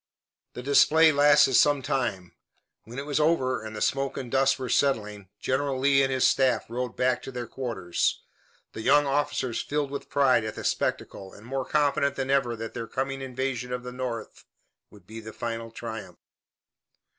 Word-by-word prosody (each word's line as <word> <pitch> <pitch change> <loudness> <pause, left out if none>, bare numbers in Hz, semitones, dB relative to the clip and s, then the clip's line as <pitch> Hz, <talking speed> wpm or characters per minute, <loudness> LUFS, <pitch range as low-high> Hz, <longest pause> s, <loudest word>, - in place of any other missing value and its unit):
The 125 - -7
display 155 +3 +5
lasted 145 -1 +5
some 145 +1 +4
time. 120 -10 -2 0.5
When 115 +4 -10
it 140 - -4
was 145 0 -1
over 130 -7 +1
and 110 0 -7
the 105 - -6
smoke 135 0 -1
and 125 -3 -6
dust 135 0 +3
were 130 -1 -5
settling, 105 -7 0
General 135 +2 -1
Lee 135 +1 +3
and 135 0 +1
his 130 -1 +3
staff 130 -2 +2
rode 125 -1 -3
back 125 0 +1
to - - -8
their 125 -2 -5
quarters, 110 -10 -2 0.5
the 110 - -6
young 145 +5 +4
officers 135 -3 -1
filled 145 -1 -2
with 140 - -6
pride 135 -5 +3
at 110 0 -5
the - - -7
spectacle 95 -1 -2
and 105 - -14
more 135 +1 -3
confident 140 -2 +1
than 135 0 -2
ever 135 -4 +1
that 115 0 -7
their 115 -2 -5
coming 135 +2 -3
invasion 130 -1 -3
of 125 0 -4
the 125 - -7
North 125 -3 -6 0.5
would 100 -4 -18
be 110 +4 -9
the 110 0 -10
final 115 -1 -5
triumph. 115 -1 -8
130 Hz, 180 wpm, -26 LUFS, 115-140 Hz, 0.5 s, display